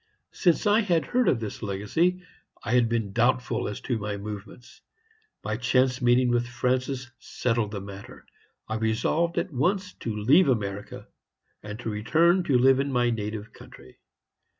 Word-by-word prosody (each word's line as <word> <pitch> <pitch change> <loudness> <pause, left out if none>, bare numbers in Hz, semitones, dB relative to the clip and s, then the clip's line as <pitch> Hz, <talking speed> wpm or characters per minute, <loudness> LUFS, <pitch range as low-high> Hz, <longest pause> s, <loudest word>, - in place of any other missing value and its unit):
Since 175 +2 +1
I 210 +1 +4
had 170 -8 +1
heard 250 0 +1
of 120 - +1
this 110 -3 -6
legacy 120 - 0 0.4
I 110 - -3
had 120 -2 +3
been 115 -4 -2
doubtful 120 0 +1
as 105 - -5
to 120 -4 -2
my 105 0 -4
movements. 105 +3 -9 0.6
My 110 0 -2
chance 125 +1 +1
meeting 120 +1 +3
with 120 0 +1
Francis 125 +1 -2
settled 115 -4 -1
the 100 -2 -5
matter. 100 0 -11 0.4
I 110 - -2
resolved 115 +10 0
at 170 -1 -2
once 185 +8 0
to 115 -3 -4
leave 140 - +4
America, 105 -4 -3 0.5
and 105 0 -7
to 115 - -3
return 160 - +3
to 135 -6 +3
live 130 +1 +5
in 140 0 -1
my 120 -2 +2
native 105 -1 -5
country. 65 - -15
120 Hz, 160 wpm, -26 LUFS, 105-135 Hz, 0.6 s, live